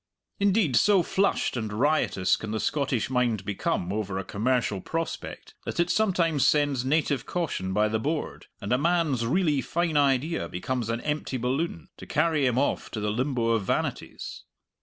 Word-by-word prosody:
Indeed, 200 - +2
so 195 - +5
flushed 195 -3 +1
and 110 -3 -3
riotous 115 -5 +2
can 110 - -7
the 110 0 -2
Scottish 135 -3 -1
mind 120 -6 +1
become 95 -2 -1
over 100 -3 -2
a 95 - -2
commercial 110 0 0
prospect 165 - -5
that - - -5
it 175 0 +2
sometimes 170 -9 +2
sends 145 -4 +2
native 140 -2 0
caution 150 - -2
by 105 +2 +2
the 110 +1 -1
board, 150 +6 -3
and 100 +2 -2
a 125 - +3
man's 155 -7 +1
really 150 -1 +2
fine 170 0 0
idea 140 +3 +1
becomes 120 +5 -3
an 115 +1 -1
empty 150 -3 -2
balloon, 125 - -2
to - - -11
carry 155 -3 +2
him 125 -1 0
off 140 - 0
to 110 - -5
the 105 0 -1
limbo 120 0 0
of 115 -3 +2
vanities. - - -3
130 Hz, 170 wpm, -27 LUFS, 110-160 Hz, -, so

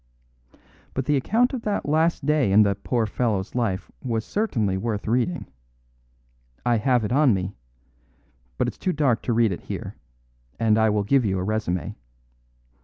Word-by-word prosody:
"But 135 - -1
the 150 - +2
account 230 - +2
of 255 - -3
that 210 -8 -2
last 160 0 +1
day 150 -8 +2
in 105 +2 +7
the 100 -1 +2
poor 115 +3 -1
fellow's 105 -3 -1
life 115 -7 -2
was 115 -4 -2
certainly 115 - 0
worth 105 +1 -3
reading. 125 +10 0 1.2
I 120 -1 +3
have 125 0 +2
it 105 - -3
on 135 -4 +4
me; 95 +1 -3 1.0
but - - +1
it's - - -6
too 185 - 0
dark 140 -6 +1
to 120 - -1
read 115 -2 +3
it 90 - -4
here, - - -6 0.6
and 110 -1 +3
I 110 0 +4
will 105 -1 +1
give 130 +5 +3
you 95 -3 0
a 90 - -2
resume. 95 -5 -2
115 Hz, 170 wpm, -24 LUFS, 105-140 Hz, 1.2 s, in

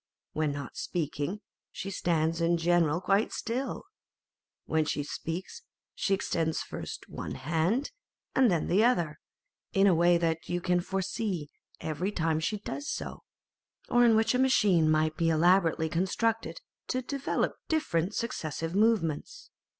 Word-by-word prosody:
When 155 -1 0
not 140 -2 -6
speaking, 165 +4 -3 0.3
she 195 - -5
stands 165 -2 0
in 170 +1 +3
general 170 -1 +2
quite 195 +3 +2
still. 250 +3 -3 0.8
When 160 0 +1
she 145 -1 -2
speaks, 170 - -5 0.3
she 195 - +1
extends 165 -4 -1
first - - -7
one - - -6
hand 165 - 0 0.4
and 260 -3 +5
then 170 -4 +1
the 200 +5 +4
other, 170 -11 +1 0.5
in 195 0 +4
a 195 - +6
way 170 +1 +4
that 165 -1 -1
you 175 - 0
can 180 0 +1
foresee 190 -4 -3 0.3
every 165 +6 -2
time 160 -4 0
she 210 +7 -1
does 285 +8 -5
so, - - -5 0.7
or 245 0 +5
in 230 -2 +6
which 220 +2 +3
a 250 - +1
machine 200 -11 +4
might 155 0 +2
be 165 -1 +2
elaborately 165 0 +3
constructed 205 +7 -1 0.3
to 255 0 -1
develop 275 +2 -1 0.2
different 200 - 0
successive 165 -7 -3
movements. 220 - 0
175 Hz, 140 wpm, -29 LUFS, 160-215 Hz, 0.8 s, a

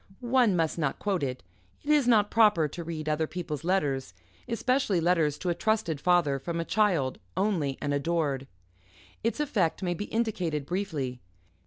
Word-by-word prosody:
One 240 -7 +5
must 165 -1 0
not 145 -4 0
quote 200 -4 -1
it 130 -2 -3 0.4
it 295 - 0
is 290 -4 +4
not 210 -4 +4
proper 210 -8 +4
to 170 +4 -7
read 160 -2 -5
other 155 +1 0
people's 160 -4 -5
letters, 140 - 0 0.3
especially 235 -4 +1
letters 165 -4 +2
to 180 - -3
a - - +2
trusted 210 -7 0
father, 170 -6 +3
from 170 +5 -4
a 165 - -2
child, 175 -13 +1 0.2
only 165 -10 0
and 145 -1 -1
adored. 140 -2 -1 0.8
Its 230 +4 -1
effect 205 - 0
may 175 -1 0
be 190 +4 -4
indicated 185 -11 -1
briefly. 150 -9 -3
170 Hz, 165 wpm, -28 LUFS, 150-205 Hz, 0.8 s, One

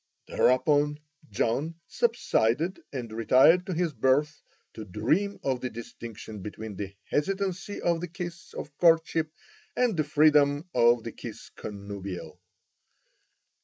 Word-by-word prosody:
Thereupon 145 +3 +2 0.3
John 120 +10 -1
subsided 185 - +1
and 120 -5 -5
retired 130 - +5
to 185 - -2
his 170 -2 0
berth 135 +5 +1 0.3
to 110 - -7
dream 140 - 0
of 130 -2 0
the 125 - -2
distinction 110 -2 -9
between 105 +1 -7
the 100 0 -6 0.2
hesitancy 195 +4 -1
of 170 -1 +1
the 175 - -3
kiss 175 0 -8
of 145 - -7
courtship 165 -2 +3 0.5
and 245 -5 +2
the 155 - +2
freedom 150 +1 +4
of 120 -1 +4
the - - -5
kiss - - -9
connubial. 100 -2 -7
145 Hz, 125 wpm, -28 LUFS, 115-170 Hz, 0.5 s, retired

